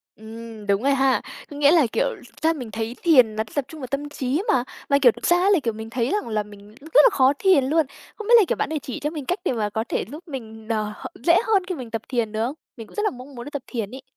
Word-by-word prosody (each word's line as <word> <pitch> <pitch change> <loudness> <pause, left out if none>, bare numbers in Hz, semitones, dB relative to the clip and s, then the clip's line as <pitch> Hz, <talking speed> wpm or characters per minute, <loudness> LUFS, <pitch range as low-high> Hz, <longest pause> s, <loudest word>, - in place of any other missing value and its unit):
Ừm, 220 -1 -10
đúng 200 +4 +1
rồi 280 0 +3
ha. 270 -1 +2 0.3
Có 290 - -9
nghĩa 290 0 +5
là, 315 -8 +5
kiểu, 230 - +1
thực 245 - -18
ra 325 +1 +3
mình 245 -8 -7
thấy 225 +2 -4
thiền 255 -10 +5
là 220 - 0
tập 285 -3 0
trung 315 - -11
vào 255 - -5
tâm 285 +3 -3
trí 280 +4 -1
mà. 255 - +3 0.3
Mà, 280 - +5
kiểu, 245 -4 +7
thực - - -8
ra 350 - +5
là, 385 -5 +5
kiểu, 230 -2 0
mình 220 +1 -8
thấy 240 +1 -1
rằng 415 - -1
là 215 -2 -1
mình 205 +1 -15
rất 315 +3 +4
là - - +8
khó 270 -5 +4
thiền 370 -9 +4
luôn. 315 +2 +2 0.3
Không 435 -1 -8
biết 480 - +4
là, 435 - +7
kiểu, - - 0
bạn - - -2
để 310 -2 -2
chỉ 255 - -6
cho 295 - -2
mình 300 -4 -6
cách 360 +5 -1
để - - +2
mà 210 -3 -1
có 220 +1 -2
thể - - -1
giúp 330 +4 -10
mình, 220 -6 -8
ờ, 215 -1 -1 0.3
dễ 340 0 +5
hơn 400 -4 +3
khi 365 - -2
mình 245 -5 -8
tập 225 -1 -2
thiền 235 -4 -1
được 220 +1 -1
không? 275 +5 -4 0.2
Mình 225 - -9
cũng - - -17
rất 420 - -1
là - - +3
mong 255 +2 -11
muốn 240 - -7
đi - - -6
tập 285 -3 -5
thiền 225 -3 -4
ấy. 260 +1 -9
260 Hz, 300 wpm, -23 LUFS, 225-300 Hz, 0.3 s, là